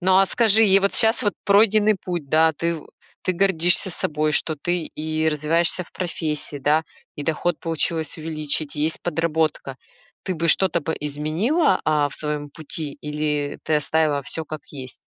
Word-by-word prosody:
Ну, 185 +1 +4
а 195 - +5
скажи, 225 +1 +4
и 195 0 +6
вот 200 - +1
сейчас 225 +1 +3
вот 205 -3 0
пройденный 210 +1 +4
путь, 175 -6 -4
да, 160 +2 +4
ты 170 +2 -2
в 155 - -12 0.3
ты 185 - 0
гордишься 180 -1 +2
собой, 155 -3 -1
что 155 +1 +1
ты 175 +4 -2
и 155 +1 -2
развиваешься 165 +4 +1
в 170 - -17
профессии, 155 -4 -3
да, 150 +3 +2 0.3
и 145 - -5
доход 160 +2 -1
получилось 165 0 -2
увеличить, 155 -1 -2
есть 155 +2 -1
подработка. 160 -4 -1 0.5
Ты 185 - -2
бы 170 0 -1
что-то 175 +1 +3
бы 160 +2 -2
изменила, 155 - +1
а, 150 -2 +2
в - - -8
своём 150 -1 -3
пути 155 -1 -4
или 150 -1 -2
ты 155 - +1
оставила 150 -1 +1
всё 160 +4 -2
как 155 -1 -7
есть? 130 -3 -8
160 Hz, 170 wpm, -22 LUFS, 150-180 Hz, 0.5 s, и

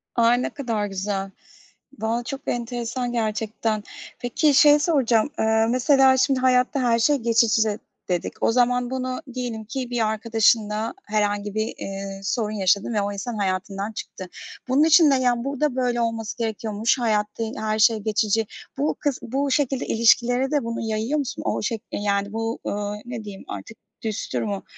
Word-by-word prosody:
Ay, 235 +1 +4
ne - - -1
kadar 230 -7 -2
güzel. 195 0 -3 0.7
Valla 230 +2 -1
çok 270 +2 -6
enteresan 240 +1 -2
gerçekten. 220 -1 -1 0.4
Peki 285 +5 +2
şeyi 295 +1 +7
soracağım, 270 -7 +2
eee 220 0 +3
mesela, 265 +1 +4
şimdi, 265 0 +2
hayatta 255 +2 +2
her 235 -2 +2
şey 295 +6 +4
geçici 225 -3 +2 0.3
dedik. 175 -2 -3
O - - +4
zaman 245 0 +2
bunu 255 +1 -3
diyelim 240 -3 -4
ki 250 +3 -4
bir 235 -3 0
arkadaşınla 220 0 +1
herhangi 205 -1 -1
bir, 220 +1 -1
eee, 195 0 -6
sorun 215 +1 -1
yaşadın 200 +3 +1
ve 210 - +1
o 200 0 -2
insan 220 +3 -5
hayatından 195 +1 -2
çıktı. 185 -3 -8 0.4
Bunun 265 +4 +4
için 315 -1 +6
de, - - +4
yani, 245 -2 +1
"Burada 280 0 -1
böyle 245 -2 0
olması 230 0 -2
gerekiyormuş. 220 +1 -1
Hayatta 215 -1 0
i - - -1
eee, 220 - -6
her 215 0 -1
şey 225 0 +5
geçici." 215 0 0 0.3
Bu 290 +2 0
kıs 285 -4 -1
bu 275 +3 -2
şekilde 270 -1 +1
ilişkilere 245 +3 +3
de 290 -3 +1
bunu 230 0 -3
yayıyor 225 +6 -1
musun? 275 -2 -4
O - - 0
şek 220 0 -2
eee, - - -3
yani, 200 0 0
bu, 225 +1 -2
ööö, 205 0 -2
ne 240 -3 -6
diyeyim 200 -2 -9
artık 225 - -8 0.3
düstur 220 -2 -2
mu 200 -2 -3
230 Hz, 170 wpm, -23 LUFS, 215-250 Hz, 0.7 s, şeyi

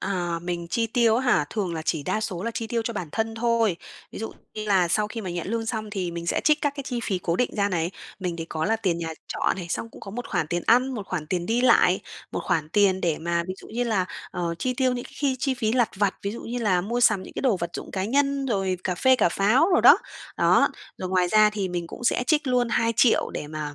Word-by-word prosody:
À, 175 -3 -2
mình 175 -1 -4
chi 230 +5 0
tiêu 225 -1 +3
á - - +1
hả? 240 -11 +4
Thường 190 -6 -2
là 160 - -4
chỉ 160 -1 -1
đa 215 - -1
số 195 -5 -3
là 230 - -2
chi 225 0 -4
tiêu 230 0 -1
cho 235 - -2
bản 185 -7 -4
thân 225 0 -1
thôi. 230 -4 +1 0.4
Ví - - -7
dụ 225 - -5 0.2
như 215 - -4
là 190 -4 +3
sau 210 +5 +2
khi 225 - -5
mà 190 -4 -5
nhận 175 -1 -4
lương 225 +2 -2
xong 215 -2 -3
thì 185 -4 -2
mình 170 0 -6
sẽ - - +1
trích 305 0 +4
các 290 - +1
cái 280 - -4
chi 245 -2 -2
phí 190 -4 -1
cố 170 -1 -1
định 250 - +1
ra 200 0 +2
này. 170 -2 -1 0.3
Mình 180 -3 -3
thì 165 - -4
có 160 -1 -3
là 225 +5 +2
tiền 185 -6 -1
nhà 165 -1 -3 0.2
trọ - - 0
này, 180 - -6
xong 230 - -3
cũng - - -14
có 195 - -8
một 245 +4 -6
khoản 155 - 0
tiền 175 +2 -2
ăn, 255 +3 +4
một 205 -4 -5
khoản 170 -6 -4
tiền 175 +1 -2
đi 230 +2 +1
lại, 255 - +4 0.3
một - - -2
khoản 155 -3 0
tiền 195 0 +3
để 165 -4 0
mà 170 +1 0
ví 185 - -3
dụ - - -12
như 240 +2 -2
là, 200 -6 +1 0.2
ờ, 170 -1 -2
chi 255 +5 -1
tiêu 255 0 +2
những 245 -1 -4
cái - - -13
khi 275 -3 0
chi 270 +1 0
phí 220 -3 -1
lặt 240 -2 +2
vặt, 200 -1 +1
ví 200 - -2
dụ 235 - -7
như 245 +2 -4
là 200 -6 +2
mua 235 +7 -2
sắm 215 -5 +4
những - - -11
cái - - -4
đồ 245 -8 +3
vật 170 -1 -4
dụng - - -7
cá 190 -1 -2
nhân, 275 +4 +1
rồi 195 -6 0
cà 180 - 0
phê 260 +7 +4
cà - - +3
pháo 215 - +3
đồ - - +4
đó. - - +8 0.4
Đó, - - +4 0.3
rồi 185 - -4
ngoài 180 -1 +2
ra 215 +2 +5
thì 200 -3 -2
mình 175 -1 -3
cũng 240 - -9
sẽ 245 - +2
trích 310 -2 +2
luôn 250 -2 +2
2.000.000 230 0 +2
để - - -5
mà, 150 -1 -5
210 Hz, 285 wpm, -25 LUFS, 175-235 Hz, 0.4 s, đó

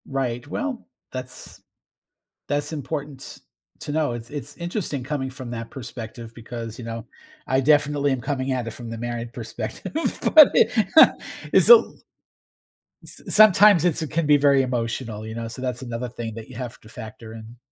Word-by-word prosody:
Right. 125 -2 -3
Well, 275 - -4 0.3
that's 130 0 -8 0.9
that's 145 +2 -1
important 145 -2 -6 0.4
to 145 - -5
know. 155 -4 0
It's 120 0 -7
it's 145 0 -7
interesting 170 - -4
coming 130 0 -3
from 130 -2 -8
that 115 -1 -6
perspective 115 -2 -8
because, 115 -1 -8
you 120 - -7
know, 115 -1 -6 0.4
I 130 0 +2
definitely 145 0 +2
am 130 - -2
coming 130 +2 -2
at 125 -2 -2
it - - -4
from 120 0 -8
the 115 - -6
married 120 0 -5
perspective, 110 -3 -6 0.4
but 310 -3 +10
i 225 - +6 0.4
It's - - +5
a 480 - +13
l 465 - +2 1.1
S - - -11
sometimes 205 -4 +6
it's 165 -2 +1
can 155 +2 -1
be 150 0 +6
very 140 -1 +4
emotional, 115 -3 -3
you 110 - -7
know, 115 0 -5
so 125 +3 -9
that's 125 -1 -3
another 120 0 -4
thing 115 -2 -6
that 115 0 -9
you 130 - -11
have 125 -1 -7
to 110 - -17
factor 110 0 -10
in. 115 +2 -11
130 Hz, 175 wpm, -23 LUFS, 115-145 Hz, 1.1 s, a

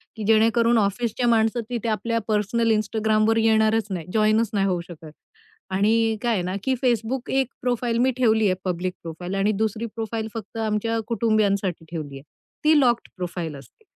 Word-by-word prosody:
की 220 - -6
जेणेकरून 230 +2 +4
ऑफिसच्या 225 +3 0
माणसं 225 0 +2
तिथे 235 -2 -2
आपल्या 230 +1 -1
पर्सनल 225 +2 +1
Instagramवर 215 +1 +1
येईल 225 0 +3
येणारच 220 0 +2
नाही, 175 -5 -4
जॉइनच 215 0 +3
नाही 195 -2 +1
होऊ 180 -2 0
शकत. 160 -3 -11 0.6
आणि 220 +3 +2
काय 240 -2 +1
आहे 190 - 0
ना, 185 +2 -3
की 265 - +1
Facebook 240 +1 0
एक 265 -2 +2
प्रोफाइल 245 -1 0
मी 260 - +3
ठेवली 220 -3 +3
आहे 185 -2 +2
पब्लिक 180 0 -2
प्रोफाइल 175 +3 -6
आणि 195 +2 +2
दुसरी 220 +1 -1
प्रोफाइल 225 0 -3
फक्त 225 0 -7
आमच्या 225 +1 -1
कुटुंबियांसाठी 205 -7 0
ठेवलीये. 145 -5 -6 0.4
ती 305 0 +5
लॉक्ड 240 -4 +2
प्रोफाइल 170 -4 -4
असते. 140 - -15
220 Hz, 170 wpm, -23 LUFS, 195-230 Hz, 0.6 s, ती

